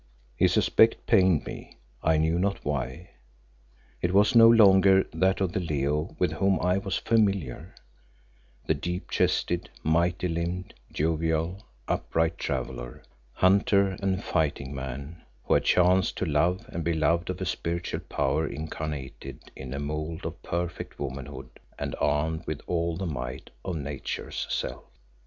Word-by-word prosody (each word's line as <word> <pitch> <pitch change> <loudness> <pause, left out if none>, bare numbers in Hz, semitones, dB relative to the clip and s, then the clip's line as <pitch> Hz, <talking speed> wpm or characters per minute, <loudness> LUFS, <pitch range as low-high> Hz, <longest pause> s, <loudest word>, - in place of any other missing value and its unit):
His - - +3
aspect 110 0 +4
pained 95 -8 +4
me, - - -9 0.2
I 80 0 +3
knew 80 +2 +2
not 100 +1 -1
why. 75 +3 -3 0.9
It 90 +2 0
was 105 +5 +5
no 115 0 +9
longer 95 -4 +6
that 95 +1 +2
of 95 -3 0
the 95 - -1
Leo 75 -1 -1
with 90 -4 +1
whom 95 +4 +2
I 90 +2 +2
was 95 -1 -2
familiar, 100 - 0 0.9
the - - +2
deep 90 +4 -4
chested, 85 +1 0
mighty 85 +3 +1
limbed, 85 +2 -3 0.2
jovial, 80 +4 -1 0.2
upright 80 0 0
traveller, 65 -2 -4 0.3
hunter 100 +1 +4
and 95 0 0
fighting 70 -4 -1
man 70 +4 -6 0.2
who - - +1
had - - +3
chanced 90 0 +3
to - - -1
love 85 +8 +1
and 85 - -4
be 85 0 0
loved 85 +2 +1
of 90 0 -3
a 95 - -2
spiritual 85 0 -2
power 75 +4 -1
incarnated 75 -3 -6
in 65 -2 -8
a 70 - -3
mould 75 +3 -4
of 80 0 -6
perfect 85 0 -4
womanhood 65 -1 -7 0.2
and - - -4
armed 80 +2 0
with 80 -1 -3
all 85 -1 -1
the 95 - -3
might 65 -4 -5
of 90 - -3
Nature's 70 -2 -4
self. - - -3
85 Hz, 145 wpm, -27 LUFS, 75-95 Hz, 0.9 s, no